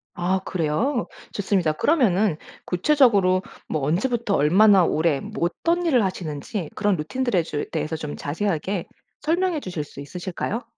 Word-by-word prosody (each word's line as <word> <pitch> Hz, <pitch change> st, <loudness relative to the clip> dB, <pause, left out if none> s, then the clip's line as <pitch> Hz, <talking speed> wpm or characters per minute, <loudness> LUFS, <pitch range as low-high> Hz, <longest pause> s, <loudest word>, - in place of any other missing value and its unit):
아 180 Hz, +2 st, 0 dB
그래요? 200 Hz, -, 0 dB, 0.2 s
좋습니다. 190 Hz, -5 st, +1 dB
그러면은 210 Hz, -, +2 dB, 0.3 s
구체적으로 195 Hz, -4 st, +3 dB, 0.3 s
뭐 155 Hz, -, -2 dB
언제부터 205 Hz, -, 0 dB
얼마나 190 Hz, +6 st, +5 dB
오래 155 Hz, -3 st, +1 dB
뭐 215 Hz, -4 st, -3 dB
어떤 340 Hz, -, -1 dB
일을 255 Hz, -10 st, +3 dB
하시는지 165 Hz, -1 st, -4 dB
그런 205 Hz, -2 st, +2 dB
루틴들에 205 Hz, +5 st, 0 dB
제 150 Hz, -2 st, -3 dB
대해서 155 Hz, 0 st, -2 dB
좀 155 Hz, -2 st, -5 dB
자세하게 180 Hz, +3 st, -2 dB, 0.4 s
설명해 345 Hz, +1 st, +1 dB
주실 175 Hz, -, -4 dB
수 140 Hz, -1 st, -11 dB
있으실까요? 180 Hz, -, -4 dB
185 Hz, 345 characters per minute, -23 LUFS, 160-230 Hz, 0.4 s, 얼마나